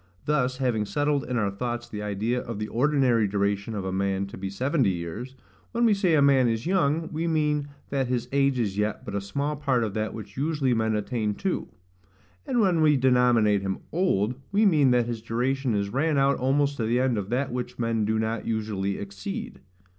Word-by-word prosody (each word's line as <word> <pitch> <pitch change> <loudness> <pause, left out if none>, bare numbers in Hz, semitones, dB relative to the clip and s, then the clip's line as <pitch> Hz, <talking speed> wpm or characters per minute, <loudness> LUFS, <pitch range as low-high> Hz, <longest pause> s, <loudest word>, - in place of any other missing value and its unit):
Thus, 130 -4 +1
having 125 -5 0
settled 145 +3 0
in 125 -1 -2
our 100 -3 +1
thoughts 120 +3 -4
the 105 - -6
idea 105 +4 -1
of 115 -3 -6
the 105 0 -4
ordinary 125 -4 +2
duration 100 +2 -1
of 100 -2 -3
a 95 - -2
man 95 0 0
to - - -9
be 95 +1 -5
seventy 130 - +1
years, 95 +9 -5 0.4
when 235 0 +2
we 220 - +5
say 185 -5 +2
a 145 - +4
man 135 -3 +5
is 115 0 -1
YOUNG, 165 -3 +1
we 165 +1 -2
mean 150 -2 +1 0.2
that 135 -2 0
his 125 -1 -1
age 140 -1 +2
is 105 -4 -1
yet 105 0 -1
but 105 - -6
a 100 - -1
small 140 +10 -2
part 135 -5 +1
of 105 -3 -3
that 110 +1 -2
which 105 -2 -9
usually 145 -3 +1
men 110 -1 +1
attain 105 0 -1
to; 190 - -2 0.8
and 250 -4 +2
when 180 -5 +3
we 150 -2 +5
denominate 125 -5 +3
him 95 -1 -2
OLD, 125 - +1 0.2
we 210 +2 +3
mean 150 -8 +4
that 125 -1 +3
his 115 -2 -4
duration 125 +2 -1
is 100 -1 -1
run 145 +6 +1
out 135 0 +3
almost 140 +2 +1
to 115 - -1
the 120 +3 +1
end 130 -2 +2
of 100 -2 -3
that 130 +4 -1
which 125 0 -4
men 115 -2 0
do 110 +1 +1
not 110 +1 -2
usually 105 -3 -2
exceed. 100 -1 -6
125 Hz, 210 wpm, -26 LUFS, 105-140 Hz, 0.8 s, we